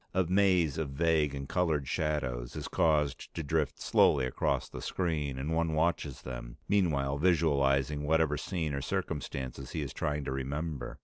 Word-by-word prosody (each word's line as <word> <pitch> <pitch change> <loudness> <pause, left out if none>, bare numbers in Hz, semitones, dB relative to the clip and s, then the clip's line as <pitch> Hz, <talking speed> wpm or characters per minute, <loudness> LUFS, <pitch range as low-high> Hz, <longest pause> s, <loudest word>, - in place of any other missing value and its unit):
A 95 - +4
maze 90 -5 +3
of 75 -3 -2
vague 75 0 +1
and 70 -1 -5
colored 80 -6 0
shadows 65 -6 -2
is - - -4
caused 75 -5 +1
to 80 - -3
drift 75 0 0
slowly 65 -3 +4
across 65 - 0
the - - -8
screen, 75 -7 -1
and 70 +5 -2
one 80 -1 +1
watches 80 -4 0
them, - - -7
meanwhile 70 -9 +1
visualizing 75 -4 +2
whatever 80 0 +2
scene 80 -2 -2
or 70 - -2
circumstances 65 -2 -4
he 80 - -2
is 70 -1 -6
trying 75 +1 -2
to - - -3
remember. 70 0 -4
75 Hz, 165 wpm, -31 LUFS, 70-80 Hz, -, A